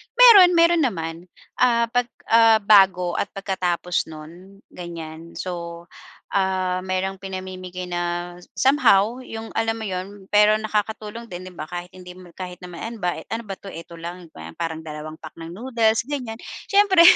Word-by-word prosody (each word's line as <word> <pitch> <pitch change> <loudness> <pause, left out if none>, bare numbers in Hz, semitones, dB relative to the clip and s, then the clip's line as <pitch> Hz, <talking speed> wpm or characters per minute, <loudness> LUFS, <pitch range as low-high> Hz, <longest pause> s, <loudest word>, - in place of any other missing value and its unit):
Meron, 420 -8 +9
meron 335 0 +5
naman, 165 - -1 0.4
ah, 235 -2 +3
pag, 245 0 +1 0.2
ah, 225 -1 +6
bago 190 -4 +5
at - - 0
pagkatapos 180 -3 -1
non, 170 +6 -12
ganyan. 165 -1 -8
So, 170 -1 -6 0.4
um, 185 -1 0
merong 190 +1 -2
pinamimigay 185 -1 -7
na 175 0 -1 0.5
somehow 235 -3 +4
yung 225 -2 -7
alam 225 0 +1
mo, - - -6
'yun? 190 +1 -6
Pero 210 +1 +6
nakakatulong 220 +1 -3
din, 185 -3 -8
'di 185 - -9
ba, 155 - -4
kahit 175 +1 -6
hindi 180 -1 -12
mo 180 -1 -14
kahit 180 -1 -8
na 180 - -8
maemba, 180 +1 -4
ano 225 +1 -4
ba 195 - -4
'to? - - -15
Eto 170 0 -10
lang? 170 0 -8
Gwe 80 - -10
parang 160 - -4
dalawang 155 +1 -7
pack 155 - -11
ng 165 0 -8
noodles, 225 +2 +1
ganyan. 250 -6 -4 0.3
Siyempre, 400 -3 +6
190 Hz, 155 wpm, -23 LUFS, 175-225 Hz, 0.5 s, Meron